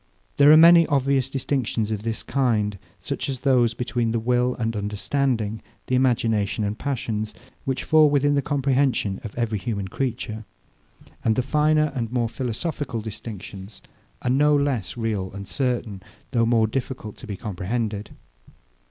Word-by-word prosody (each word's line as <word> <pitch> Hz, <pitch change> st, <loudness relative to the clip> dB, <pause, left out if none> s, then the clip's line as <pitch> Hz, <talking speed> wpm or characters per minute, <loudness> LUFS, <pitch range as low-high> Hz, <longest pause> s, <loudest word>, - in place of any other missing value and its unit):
There 145 Hz, +1 st, +7 dB
are 155 Hz, -, +9 dB
many 170 Hz, +1 st, +8 dB
obvious 135 Hz, -2 st, +1 dB
distinctions 130 Hz, -5 st, -1 dB
of 105 Hz, -2 st, -2 dB
this 115 Hz, 0 st, -3 dB
kind, 110 Hz, -7 st, 0 dB, 0.2 s
such -, -, -4 dB
as 130 Hz, -2 st, -4 dB
those 125 Hz, -4 st, +3 dB
between 120 Hz, -2 st, -1 dB
the 115 Hz, -, +1 dB
will 125 Hz, +2 st, +1 dB
and 115 Hz, -1 st, -2 dB
understanding, 110 Hz, +2 st, -1 dB, 0.2 s
the -, -, -4 dB
imagination 115 Hz, -5 st, +1 dB
and 105 Hz, 0 st, -1 dB
passions, 110 Hz, -5 st, -3 dB, 0.3 s
which 130 Hz, -1 st, -2 dB
fall 155 Hz, -1 st, +5 dB
within 145 Hz, 0 st, +2 dB
the 140 Hz, -, +2 dB
comprehension 135 Hz, -8 st, 0 dB
of 105 Hz, -, -7 dB
every 115 Hz, -3 st, -1 dB
human 100 Hz, -4 st, -3 dB
creature; 115 Hz, -2 st, -3 dB, 0.8 s
and 110 Hz, -, +2 dB
the 130 Hz, -, +1 dB
finer 150 Hz, +2 st, +2 dB
and 120 Hz, -4 st, -3 dB
more 120 Hz, -2 st, 0 dB
philosophical 125 Hz, 0 st, -3 dB
distinctions 105 Hz, -2 st, -8 dB, 0.4 s
are 125 Hz, -, +1 dB
no 150 Hz, +3 st, +4 dB
less 140 Hz, -8 st, -1 dB
real 105 Hz, -5 st, -2 dB
and 100 Hz, 0 st, -7 dB
certain, 120 Hz, -7 st, -2 dB, 0.3 s
though 115 Hz, -3 st, +2 dB
more 115 Hz, -2 st, +4 dB
difficult 120 Hz, -2 st, -4 dB
to 125 Hz, -, -11 dB
be 100 Hz, -3 st, -5 dB
comprehended. 105 Hz, +1 st, -3 dB
120 Hz, 150 wpm, -24 LUFS, 110-135 Hz, 0.8 s, are